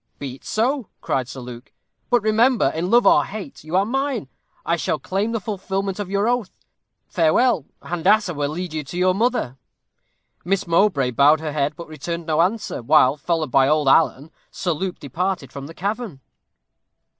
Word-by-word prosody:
'Be 135 Hz, -3 st, -6 dB
it -, -, -31 dB
so,' 245 Hz, +1 st, -1 dB
cried 130 Hz, -3 st, -1 dB
Sir 130 Hz, -, -8 dB
Luke; 120 Hz, +1 st, -10 dB, 0.4 s
'but 240 Hz, -3 st, +3 dB
remember, 225 Hz, +4 st, +3 dB
in 170 Hz, +3 st, -2 dB
love 240 Hz, +3 st, +4 dB
or -, -, +6 dB
hate, 195 Hz, -11 st, -8 dB
you 155 Hz, +3 st, -4 dB
are 195 Hz, +1 st, +3 dB
mine; 265 Hz, -, -2 dB, 0.4 s
I 170 Hz, -, +2 dB
shall 170 Hz, -, -1 dB
claim 200 Hz, +4 st, -2 dB
the 230 Hz, -, -1 dB
fulfilment 195 Hz, -1 st, -3 dB
of 200 Hz, -3 st, -4 dB
your 200 Hz, +2 st, +1 dB
oath. 245 Hz, -5 st, 0 dB, 0.6 s
Farewell. 165 Hz, -, +2 dB, 0.2 s
Handassah 185 Hz, +3 st, +2 dB
will 145 Hz, -1 st, -2 dB
lead 175 Hz, +2 st, -5 dB
you 155 Hz, -1 st, -3 dB
to 155 Hz, +6 st, -8 dB
your 185 Hz, 0 st, +3 dB
mother.' 220 Hz, -, 0 dB, 0.9 s
Miss 195 Hz, +2 st, 0 dB
Mowbray 165 Hz, -7 st, +2 dB
bowed 145 Hz, +5 st, +5 dB
her 155 Hz, -1 st, -4 dB
head, 145 Hz, 0 st, 0 dB
but 170 Hz, -, -9 dB
returned 165 Hz, +2 st, -5 dB
no 160 Hz, 0 st, +2 dB
answer, 195 Hz, -, -1 dB
while, 130 Hz, +3 st, +4 dB
followed 155 Hz, -1 st, -2 dB
by 135 Hz, +1 st, +4 dB
old 150 Hz, -1 st, +2 dB
Alan, 140 Hz, +1 st, +3 dB, 0.2 s
Sir 180 Hz, -, -2 dB
Luke 180 Hz, +3 st, -3 dB
departed 160 Hz, 0 st, -3 dB
from 140 Hz, 0 st, -7 dB
the 165 Hz, -, -11 dB
cavern." 205 Hz, -, -4 dB
175 Hz, 180 wpm, -22 LUFS, 145-205 Hz, 0.9 s, or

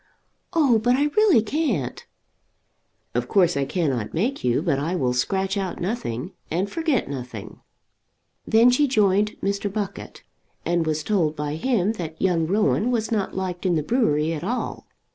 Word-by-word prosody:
"Oh, 280 Hz, -9 st, +4 dB
but 245 Hz, +3 st, +3 dB
I 290 Hz, +3 st, +2 dB
really 415 Hz, -, +5 dB
can't." 225 Hz, -, -2 dB, 1.1 s
"Of 120 Hz, 0 st, -1 dB
course 175 Hz, 0 st, +3 dB
I 140 Hz, -1 st, 0 dB
cannot 135 Hz, -, -2 dB
make 235 Hz, +12 st, -1 dB
you, 125 Hz, +4 st, +1 dB
but 150 Hz, -6 st, +1 dB
I 165 Hz, +6 st, -1 dB
will 130 Hz, -8 st, 0 dB
scratch 190 Hz, +10 st, 0 dB
out 190 Hz, -3 st, -3 dB
nothing, 175 Hz, -, -3 dB, 0.2 s
and 180 Hz, +5 st, 0 dB
forget 310 Hz, +2 st, 0 dB
nothing." 125 Hz, -6 st, -7 dB, 0.9 s
Then 230 Hz, +3 st, +6 dB
she 290 Hz, +4 st, +3 dB
rejoined 210 Hz, -5 st, +2 dB
Mr. 200 Hz, 0 st, -1 dB
Buckett, 200 Hz, -1 st, -5 dB, 0.4 s
and 170 Hz, -2 st, +1 dB
was 155 Hz, 0 st, -1 dB
told 170 Hz, -8 st, +1 dB
by 150 Hz, -1 st, -3 dB
him 210 Hz, +3 st, +1 dB
that 160 Hz, -1 st, -6 dB
young 170 Hz, -4 st, +1 dB
Rowan 210 Hz, +4 st, +2 dB
was 230 Hz, -2 st, -1 dB
not 210 Hz, -4 st, -1 dB
liked 185 Hz, -2 st, -3 dB
in 180 Hz, -3 st, +2 dB
the 155 Hz, -, 0 dB
brewery 160 Hz, -, +1 dB
at 160 Hz, -, -5 dB
all. 240 Hz, +7 st, -3 dB
190 Hz, 160 wpm, -23 LUFS, 155-225 Hz, 1.1 s, Then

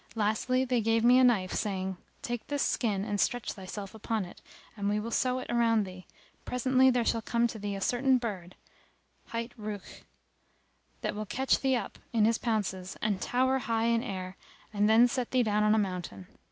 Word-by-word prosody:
Lastly 225 Hz, +4 st, +1 dB
they 245 Hz, -2 st, +1 dB
gave 225 Hz, +1 st, +2 dB
me 250 Hz, +2 st, +7 dB
a -, -, +5 dB
knife 210 Hz, -7 st, +3 dB
saying, 190 Hz, -2 st, -2 dB, 0.3 s
"Take 240 Hz, -1 st, -4 dB
this 285 Hz, -1 st, 0 dB
skin 205 Hz, -5 st, 0 dB
and 205 Hz, -1 st, -1 dB
stretch 245 Hz, -3 st, -1 dB
thyself 195 Hz, +1 st, -7 dB
upon 220 Hz, -1 st, -2 dB
it 175 Hz, -, -13 dB, 0.3 s
and 200 Hz, -2 st, -1 dB
we 210 Hz, +1 st, +1 dB
will 230 Hz, +2 st, -5 dB
sew 255 Hz, +2 st, +1 dB
it 255 Hz, -, -5 dB
around 230 Hz, -2 st, +3 dB
thee, 185 Hz, -1 st, -11 dB, 0.4 s
presently 260 Hz, +1 st, +3 dB
there 245 Hz, -2 st, +1 dB
shall 230 Hz, -, +1 dB
come 235 Hz, +1 st, +1 dB
to 230 Hz, -2 st, -3 dB
thee 205 Hz, 0 st, -3 dB
a 195 Hz, -, -6 dB
certain 255 Hz, +4 st, +3 dB
bird, 195 Hz, -7 st, -5 dB, 0.7 s
hight 230 Hz, +1 st, -4 dB
Rukh,[FN#284] 210 Hz, -2 st, -7 dB, 1.0 s
that -, -, -2 dB
will 215 Hz, 0 st, -5 dB
catch 265 Hz, +5 st, +1 dB
thee 265 Hz, -1 st, +2 dB
up 240 Hz, -, -4 dB
in 220 Hz, -2 st, +4 dB
his 230 Hz, 0 st, +2 dB
pounces 190 Hz, -5 st, -2 dB
and 205 Hz, -3 st, -1 dB
tower 260 Hz, +2 st, +1 dB
high 230 Hz, -2 st, 0 dB
in 230 Hz, 0 st, +2 dB
air 185 Hz, -4 st, -5 dB, 0.4 s
and 205 Hz, +1 st, +2 dB
then 230 Hz, +3 st, +7 dB
set 250 Hz, -1 st, -2 dB
thee 255 Hz, -1 st, +2 dB
down 210 Hz, -1 st, +1 dB
on 210 Hz, +1 st, +4 dB
a -, -, +2 dB
mountain. 180 Hz, -, -3 dB
225 Hz, 195 wpm, -30 LUFS, 200-245 Hz, 1.0 s, me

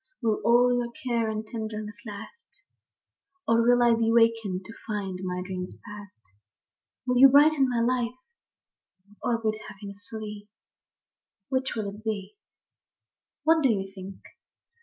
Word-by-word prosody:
Will 220 Hz, -2 st, +1 dB
all 245 Hz, +1 st, +5 dB
your 240 Hz, -1 st, -2 dB
care 235 Hz, -3 st, -1 dB
and 215 Hz, 0 st, -3 dB
your 215 Hz, -, -20 dB
tenderness 215 Hz, 0 st, -5 dB
last; 215 Hz, -, -11 dB, 0.8 s
Or 230 Hz, 0 st, +4 dB
will 245 Hz, +1 st, +4 dB
I 235 Hz, -1 st, +5 dB
be 225 Hz, 0 st, +2 dB
wakened 225 Hz, -5 st, +2 dB
to 225 Hz, -, -10 dB
find 200 Hz, -4 st, -3 dB
my 180 Hz, -1 st, -3 dB
dreams 185 Hz, -1 st, -5 dB
past? 205 Hz, -, -11 dB, 0.8 s
Will 250 Hz, -1 st, +2 dB
you 270 Hz, -, +11 dB
brighten 285 Hz, -1 st, +5 dB
my 240 Hz, -2 st, 0 dB
life, 245 Hz, 0 st, 0 dB, 1.1 s
or 235 Hz, -, +1 dB
bid 215 Hz, -1 st, -2 dB
happiness 200 Hz, 0 st, -10 dB
flee, 210 Hz, -2 st, -7 dB, 0.5 s
— 195 Hz, -, -64 dB
Which 265 Hz, -1 st, -1 dB
will 215 Hz, -3 st, -2 dB
it 210 Hz, +2 st, -13 dB
be? 215 Hz, -, -4 dB, 1.1 s
What 320 Hz, 0 st, +4 dB
do 270 Hz, -, +4 dB
you 195 Hz, -3 st, -1 dB
think? 190 Hz, 0 st, -8 dB
225 Hz, 145 wpm, -27 LUFS, 205-245 Hz, 1.1 s, you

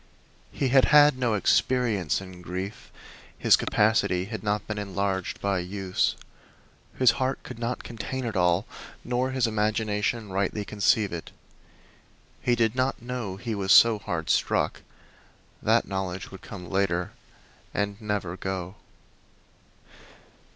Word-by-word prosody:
He 135 Hz, -, -1 dB
had 135 Hz, +1 st, +6 dB
had 150 Hz, -1 st, +6 dB
no 125 Hz, -4 st, 0 dB
experience 105 Hz, -, +1 dB
in 95 Hz, -2 st, -11 dB
grief; 95 Hz, +3 st, -6 dB, 0.5 s
his -, -, +5 dB
capacity 100 Hz, -4 st, +2 dB
had 110 Hz, +2 st, -6 dB
not 105 Hz, 0 st, -1 dB
been 105 Hz, -1 st, -4 dB
enlarged 100 Hz, -2 st, -2 dB
by 100 Hz, -2 st, 0 dB
use. 95 Hz, +1 st, -1 dB, 0.8 s
His 130 Hz, -3 st, +6 dB
heart 130 Hz, +1 st, -1 dB
could 125 Hz, -2 st, -9 dB
not 120 Hz, +1 st, -3 dB
contain 120 Hz, +3 st, -5 dB
it 110 Hz, -3 st, -3 dB
all, 90 Hz, +1 st, +2 dB, 0.4 s
nor 125 Hz, +2 st, 0 dB
his 130 Hz, -2 st, +1 dB
imagination 105 Hz, 0 st, -1 dB
rightly 100 Hz, +2 st, -1 dB
conceive 105 Hz, -1 st, +1 dB
it. 85 Hz, -, -6 dB, 1.1 s
He 120 Hz, -, +2 dB
did 115 Hz, -2 st, +2 dB
not 130 Hz, +1 st, 0 dB
know 120 Hz, -5 st, -4 dB
he 115 Hz, +3 st, -4 dB
was 100 Hz, -2 st, -1 dB
so 115 Hz, -1 st, +7 dB
hard 80 Hz, -5 st, -2 dB
struck; -, -, +1 dB, 0.8 s
that -, -, +2 dB
knowledge 95 Hz, -1 st, -4 dB
would 95 Hz, -, -10 dB
come 90 Hz, -4 st, -9 dB
later, 95 Hz, -2 st, 0 dB, 0.6 s
and 100 Hz, +1 st, -2 dB
never 105 Hz, -5 st, -2 dB
go. 95 Hz, 0 st, -5 dB
105 Hz, 130 wpm, -26 LUFS, 95-115 Hz, 1.1 s, so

